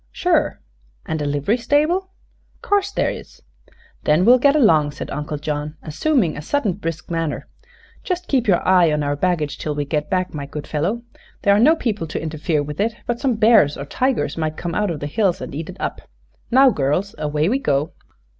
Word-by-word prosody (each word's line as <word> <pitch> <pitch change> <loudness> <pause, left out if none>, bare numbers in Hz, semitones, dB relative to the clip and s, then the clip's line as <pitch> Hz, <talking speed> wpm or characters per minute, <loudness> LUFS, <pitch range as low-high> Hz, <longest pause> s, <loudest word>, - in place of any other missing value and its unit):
"Sure." - - +1 0.5
"And 160 -1 -3
a - - -1
livery 145 - 0
stable?" 305 +10 +1 0.5
"'Course 405 -1 +1
there - - 0
is." - - -10 0.6
"Then 155 +5 +3
we'll 250 +2 +7
get 280 +3 +4
along," 155 - +4
said - - -7
Uncle 150 +1 -4
John, 150 +1 -4
assuming 175 - 0
a - - -6
sudden 220 - 0
brisk 165 -3 -6
manner. 165 -3 -2 0.6
"Just 360 -1 -3
keep 255 -5 +1
your 180 -4 +2
eye 180 -3 +5
on 150 0 0
our 145 0 0
baggage 155 -2 -1
till 150 -1 -3
we 145 0 -2
get 150 +1 -2
back, 185 -1 -1
my 145 -2 -5
good 145 +1 -7
fellow. 180 +11 -2 0.4
There 200 0 +5
are - - +3
no 300 +8 +6
people 215 - -2
to - - -4
interfere 155 -1 -1
with 150 +1 -7
it, 220 +2 0
but 240 -1 -2
some 265 -4 +1
bears 215 -10 +4
or 140 - -5
tigers 250 - -1
might 155 -1 -2
come 175 -1 -4
out 210 +1 0
of 160 -4 -4
the - - -3
hills 185 +4 0
and - - -7
eat 155 +3 -5
it - - -9
up. - - -3 0.5
Now, 265 +2 +6
girls, 165 +4 -1
away 150 +1 0
we 255 +7 +1
go!" 145 - 0
170 Hz, 200 wpm, -21 LUFS, 150-235 Hz, 0.6 s, we'll